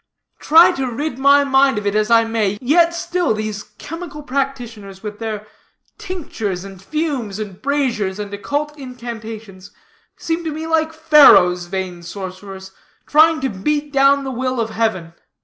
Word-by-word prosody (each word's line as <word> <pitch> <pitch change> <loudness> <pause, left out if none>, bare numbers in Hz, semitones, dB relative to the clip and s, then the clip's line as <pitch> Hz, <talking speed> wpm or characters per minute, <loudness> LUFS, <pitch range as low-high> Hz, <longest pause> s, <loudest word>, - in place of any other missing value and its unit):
Try 325 +3 +6
to 265 -1 -1
rid 275 +2 -4
my 280 +1 +5
mind 270 -2 +3
of 210 - -4
it 200 - 0
as 215 +1 +1
I 230 -1 +5
may, 220 -3 -1
yet 330 +7 +3
still 345 -7 -1
these 215 -1 -4
chemical 300 +8 -9
practitioners 245 -8 -4
with 210 -1 -7
their 215 -2 -5 0.5
tinctures, 285 - -5
and 195 -2 -11
fumes, 270 -5 -3
and 205 -4 -7
braziers, 255 -9 -1
and 205 -1 -6
occult 290 +8 -3
incantations, 225 -6 -9 0.5
seem 330 +1 -3
to 320 - -3
me 315 +2 -5
like 320 0 +1
Pharaoh's 290 - +5
vain 185 -1 -5
sorcerers, 190 +1 -8 0.3
trying 315 +1 +4
to 265 - 0
beat 290 +9 -2
down 275 +1 +4
the 270 - -4
will 255 0 -2
of 225 -1 -2
heaven. 195 -7 -2
235 Hz, 155 wpm, -19 LUFS, 205-295 Hz, 0.5 s, Try